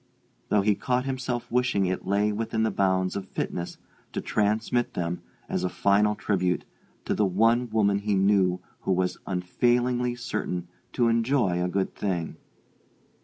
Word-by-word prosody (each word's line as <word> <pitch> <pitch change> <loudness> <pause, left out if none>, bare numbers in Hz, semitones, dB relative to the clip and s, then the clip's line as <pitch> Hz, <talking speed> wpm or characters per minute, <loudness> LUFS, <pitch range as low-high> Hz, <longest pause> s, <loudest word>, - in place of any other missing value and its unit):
though 105 - +4
he 105 +1 +3
caught 125 +5 -1
himself 125 -2 -2
wishing 125 -5 +2
it 90 0 -2
lay 100 +2 +2
within 110 +1 -1
the 110 - +1
bounds 95 -1 +1
of 100 -1 -4
fitness 85 0 -4 0.3
to - - -3
transmit 110 +3 0
them, 85 0 -2 0.3
as - - -2
a 90 - +1
final 105 +3 +3
tribute, 90 -4 0 0.4
to - - 0
the 105 - +1
one 115 +6 +3
woman 100 -2 +2
he 100 0 0
knew 95 -2 +3 0.2
who - - -2
was 90 0 0
unfailingly 120 +7 +1
certain 90 -7 -3 0.2
to 120 -2 +2
enjoy 115 -6 +2
a - - +1
good 95 +1 -1
thing. 90 -5 -2
105 Hz, 155 wpm, -26 LUFS, 95-120 Hz, 0.4 s, though